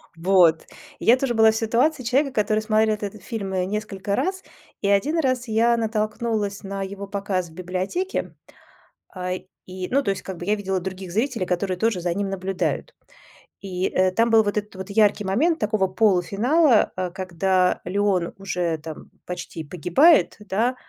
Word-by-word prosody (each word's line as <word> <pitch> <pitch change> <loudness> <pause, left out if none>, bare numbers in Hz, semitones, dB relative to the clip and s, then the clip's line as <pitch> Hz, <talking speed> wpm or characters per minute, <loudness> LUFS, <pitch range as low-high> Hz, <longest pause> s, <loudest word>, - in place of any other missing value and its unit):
Вот, 170 -2 +4 0.3
и - - -7
я 240 +3 +6
тоже 255 -2 -1
была 220 -1 +5
в - - -5
ситуации 245 +6 +1
человека, 270 +3 +1
который 215 -1 +1
смотрел 215 0 +2
этот 205 -1 -7
фильм, 200 -4 -5
э, 180 -1 0
несколько 200 -1 -3
раз. 380 0 -2 0.4
И 200 - 0
1 275 +12 +2
раз 255 -4 0
я 230 +2 +3
натолкнулась 215 -2 -2
на 195 0 -5
его 200 +1 -7
показ 195 -3 -2
в - - -17
библиотеке. 185 - -3 0.8
А, 180 0 -3 0.3
и 185 0 -6
ну 275 +2 +2
то - - -1
есть 195 - -4
как 190 -2 -6
бы 175 - -7
я 210 +1 +2
видела 190 -2 -2
других 190 0 -6
зрителей, 225 -2 -1
которые 180 +1 -1
тоже 220 -3 0
за 175 -1 -1
ним 200 +1 -2
наблюдают. 190 -1 -2 0.7
И, 185 -1 -2
э, 185 0 +2
там 230 +4 +2
был 225 -1 +5
вот 205 +1 -2
этот 210 -1 -4
вот 190 +1 -7
яркий 210 0 +3
момент 295 - +1
такого 210 -2 +1
полуфинала, 215 - +3
а, 185 -1 -3
когда 185 0 0
Леон 190 -2 0
уже 175 -4 -2
там 155 0 -9 0.2
почти 180 -2 -6
погибает, 180 - +4
да, 220 +5 -1
200 Hz, 170 wpm, -23 LUFS, 185-225 Hz, 0.8 s, я